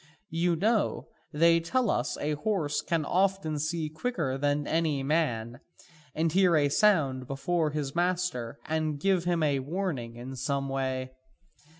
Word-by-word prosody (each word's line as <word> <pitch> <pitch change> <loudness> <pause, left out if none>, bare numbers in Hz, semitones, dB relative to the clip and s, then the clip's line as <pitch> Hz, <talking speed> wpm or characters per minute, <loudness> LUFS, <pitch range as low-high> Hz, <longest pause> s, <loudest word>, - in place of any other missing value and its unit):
You 170 +1 +1
know, 215 +5 0 0.2
they 165 +1 +4
tell 225 +7 +1
us 120 +3 -1
a 150 - -2
horse 150 -2 -1
can 165 -3 -1
often 185 -4 +1
see 155 +1 -1
quicker 155 - -2
than 145 +1 0
any 155 -4 0
man, 125 -6 0 0.6
and 160 +1 +1
hear 180 -1 +4
a 145 -2 +3
sound 140 - +2
before 155 +4 0
his 145 -2 -3
master, 175 -9 -1
and 155 -2 -1
give 185 0 +1
him 175 -2 +1 0.2
warning 150 -10 -3
in 125 +3 -7
some 135 +1 -2
way. 130 -1 -2
155 Hz, 140 wpm, -28 LUFS, 135-175 Hz, 0.6 s, they